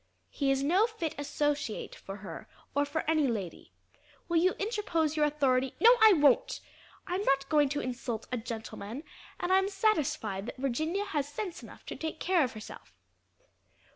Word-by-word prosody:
"He 280 -2 0
is 270 0 +2
no 370 +10 +4
fit 445 -9 -4
associate 290 -4 -2
for 195 - -8
her 165 -3 -8 0.3
or 285 +1 +2
for 290 +2 -3
any 310 -3 +3
lady. 200 -8 -4 0.6
Will 340 - +1
you 360 +3 +4
interpose 395 -8 0
your 300 -1 +3
authority 265 -3 +1
" - - -32
"No, 465 - +8
I 440 -2 +9
won't; 320 - +3 0.5
I'm 360 +2 -2
not 275 -5 +2
going 295 -3 +4
to 290 +1 -1
insult 245 -3 -4
a 250 - 0
gentleman, 225 +2 -6 0.4
and 360 +1 +1
I'm 385 +1 +4
satisfied 305 - 0
that 245 - -7
Virginia 310 +10 -1
has 295 -8 -2
sense 360 +4 -5
enough - - -13
to - - -6
take 315 0 -5
care 360 -3 +3
of 250 - -2
herself." 215 -1 -11
295 Hz, 170 wpm, -30 LUFS, 255-355 Hz, 0.6 s, I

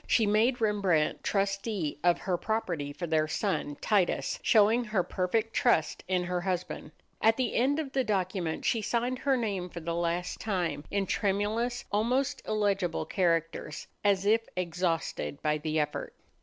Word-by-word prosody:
She 225 - +4
made 220 +5 +3
Rembrandt 200 -8 +1
trustee 195 -4 -1
of 175 -1 +4
her 185 -2 0
property 175 -8 -2
for 175 +5 -5
their 155 -2 +1
son 155 -4 -2
Titus, 200 -5 +1
showing 225 +2 +4
her 210 -4 +1
perfect 215 +6 -1
trust 200 -11 +2
in 180 -1 +1
her 180 0 -2
husband. 180 -1 -3 0.3
At 225 0 +4
the 255 -3 0
end 270 +5 +2
of 300 -4 -3
the 265 0 +1
document 185 -6 -1
she 225 - +2
signed 245 +4 -1
her 275 -2 +2
name 200 -6 -2
for 170 - -7
the 170 0 -3
last 170 +1 -1
time 180 -8 -2
in 200 -1 0
tremulous, 215 +6 0
almost 255 +7 +1
illegible 200 -6 0
characters, 165 -3 -1 0.2
as 200 -1 +2
if 225 +2 +3
exhausted 170 -4 -2
by 150 0 +1
the 155 +1 -1
effort. 150 -1 -3
195 Hz, 155 wpm, -29 LUFS, 170-220 Hz, 0.3 s, She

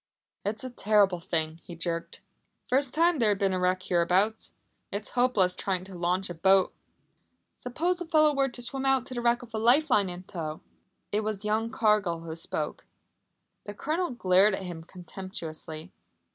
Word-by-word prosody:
"It's 210 +4 -2
a 255 - -5
terrible 205 -5 +3
thing," 165 -2 -2
he 175 - -9
jerked. 170 0 -4 0.5
"First 265 +1 +1
time 335 0 +2
there 225 -3 +4
has 205 - +2
been 195 -1 +1
a 185 - 0
wreck 185 0 +1
hereabouts. 185 +5 +1 0.4
It's 200 +1 -5
hopeless 245 -8 +3
trying 185 -1 -2
to 190 0 -11
launch 180 +2 0
a 175 - -5
boat 190 +3 +3 0.4
" - - -45 0.3
"Suppose 345 +9 -2
a 350 - -5
fellow 310 -2 +4
were 275 -1 +1
to 245 0 -4
swim 270 +2 -2
out 270 -2 +3
to 260 - -6
the 240 - -3
wreck 240 0 +2
with 230 -2 -14
a 220 - -1
life 260 +7 +4
line 200 -5 +4
in 180 0 -7
tow?" 160 -4 -6 0.5
It 210 +1 0
was 210 -1 -3
young 220 +2 0
Cargill 210 -7 +1
who 165 -1 -6
spoke. 165 - -4 0.8
The 205 - -7
Colonel 330 - -1
glared 195 -3 +3
at 190 - -6
him 175 -3 -7
contemptuously. 175 -2 -7
200 Hz, 185 wpm, -28 LUFS, 180-245 Hz, 0.8 s, there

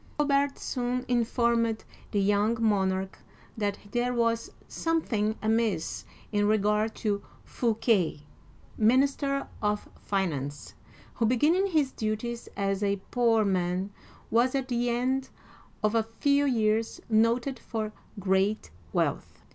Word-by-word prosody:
Colbert 280 -1 +2
soon 250 0 -2
informed 235 -2 +1 0.2
the 205 - 0
young 205 +3 +2
monarch 190 -3 +1 0.4
that 205 -2 -1
there 240 +2 +1
was 230 -1 +1 0.2
something 225 -11 0
amiss 220 -6 0 0.3
in 205 -1 +2
regard 210 +1 +2
to 205 -3 -1 0.2
Fouquet 225 -6 +1
(foo - - -17
ke'), 145 - -25
minister 275 +4 +2
of 210 0 0
finance, 145 -8 -2 0.4
who, 230 - +1
beginning 310 - +3
his 305 -7 +1
duties 230 +2 -3
as 195 0 0
a 200 -1 +1
poor 230 -3 +3
man, 185 0 0 0.4
was 245 +4 +3
at 265 -1 -1
the 240 0 +1
end 255 +3 0 0.5
of 215 0 +2
a 225 - +4 0.2
few 285 0 +3
years 220 -3 +1
noted 230 +4 +2
for 215 -2 -4 0.2
great 195 - +1 0.2
wealth. - - -2
225 Hz, 125 wpm, -28 LUFS, 205-245 Hz, 0.5 s, a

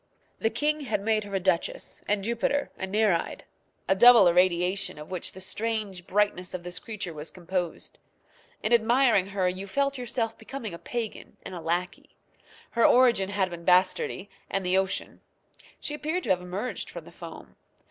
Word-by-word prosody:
The 225 - +2
king 300 +5 0
had 280 -8 -1
made 215 0 +1
her 200 -1 -5
a - - +2
duchess, 185 -2 -1
and 205 -1 +1
Jupiter 235 +6 0
a 190 - -4
Nereid 200 -3 +1 0.4
a - - +5
double 230 -1 +8
irradiation 180 +1 +2
of 150 +3 -10
which 180 -2 -4
the 190 - -10
strange, 205 -2 -3
brightness 190 -3 0
of 175 - -6
this 175 0 -4
creature 210 -6 -5
was 150 +1 -6
composed. 180 -1 -4 0.6
In 225 - +2
admiring 235 -3 +4
her 195 -2 0
you 185 +2 -3
felt 275 +5 0
yourself 235 -2 -2
becoming 235 -8 -6
a 170 - -7
pagan 235 -3 -5
and - - -8
a 175 - -6
lackey. 175 +2 -3 0.6
Her 230 - +2
origin 240 -6 +5
had 195 -2 0
been 170 -1 -7
bastardy 185 +2 +2 0.2
and 195 -1 -1
the 180 +1 +2
ocean. 190 0 -1 0.6
She 295 - -4
appeared 315 +4 -2
to 200 - 0
have 180 -1 +2
emerged 190 +7 -4
from - - -8
the - - -13
foam. - - -11
195 Hz, 175 wpm, -27 LUFS, 180-230 Hz, 0.6 s, double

